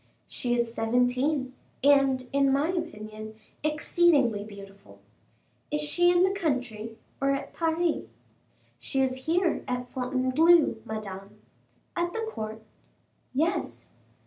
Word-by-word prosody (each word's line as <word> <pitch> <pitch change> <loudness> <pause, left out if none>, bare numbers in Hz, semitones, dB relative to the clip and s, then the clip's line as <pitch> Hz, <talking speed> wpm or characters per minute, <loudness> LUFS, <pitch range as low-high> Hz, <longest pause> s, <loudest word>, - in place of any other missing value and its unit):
"She 240 -1 -1
is 235 -1 0
seventeen, 250 +4 +1 0.3
and, 275 -2 +4
in 275 -1 +3
my 280 +4 +2
opinion, 215 - -5 0.3
exceedingly 300 -7 +2
beautiful." 200 -1 -13 0.7
"Is 300 - -1
she 345 +4 +3
in 355 0 +4
the 380 - +3
country, 250 - -2 0.2
or 275 - +2
at 275 - -6
Paris?" 330 0 0 0.7
"She 270 - 0
is 260 +1 -1
here 345 +2 +1
at 250 -1 -3
Fontainebleau, 260 +4 +3
Madame." 205 -2 -7 0.6
"At 345 0 -1
the 450 0 -2
court?" 220 - -6 0.7
"Yes." 320 +7 -1
265 Hz, 115 wpm, -27 LUFS, 225-320 Hz, 0.7 s, and